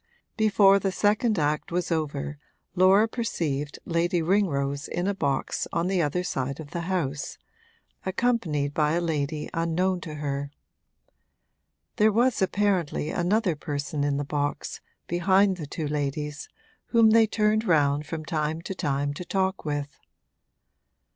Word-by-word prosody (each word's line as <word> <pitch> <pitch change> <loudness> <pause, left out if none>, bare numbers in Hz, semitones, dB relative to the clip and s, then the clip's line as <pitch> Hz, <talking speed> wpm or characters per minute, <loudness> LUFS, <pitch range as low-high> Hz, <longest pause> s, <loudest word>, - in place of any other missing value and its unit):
Before 200 -3 +5
the 195 -1 -1
second 210 +3 +2
act 150 +1 0
was 175 +1 -1
over 150 -2 -2 0.3
Laura 190 +4 +5
perceived 150 - -2
Lady 170 +1 +1
Ringrose 150 -6 0
in 175 +1 -2
a 200 - +1
box 140 -8 -1
on 170 +1 0
the 185 -1 +1
other 165 +4 0
side 135 -4 -3
of 150 -2 -9
the 170 +1 -4
house, 150 -6 -2 0.7
accompanied 185 -9 0
by 150 0 +2
a 170 - +2
lady 155 -3 -2
unknown 175 +3 0
to 155 -3 -7
her. 140 -1 -3 1.5
There 215 -1 +5
was 235 +2 +2
apparently 190 -6 0
another 185 0 +1
person 145 0 -3
in 145 -1 +1
the 145 - -2
box, 145 0 -3 0.2
behind 190 +2 +3
the 155 -4 -6
two 155 +1 -4
ladies, 150 0 -3 0.4
whom 230 -2 +5
they 225 0 +6
turned 215 0 +2
round 145 -4 +2
from 155 +1 -5
time 155 +2 -2
to 195 - -4
time 145 -5 -1
to 160 - -6
talk 190 0 -1
with. 145 -1 -3
165 Hz, 140 wpm, -26 LUFS, 145-190 Hz, 1.5 s, they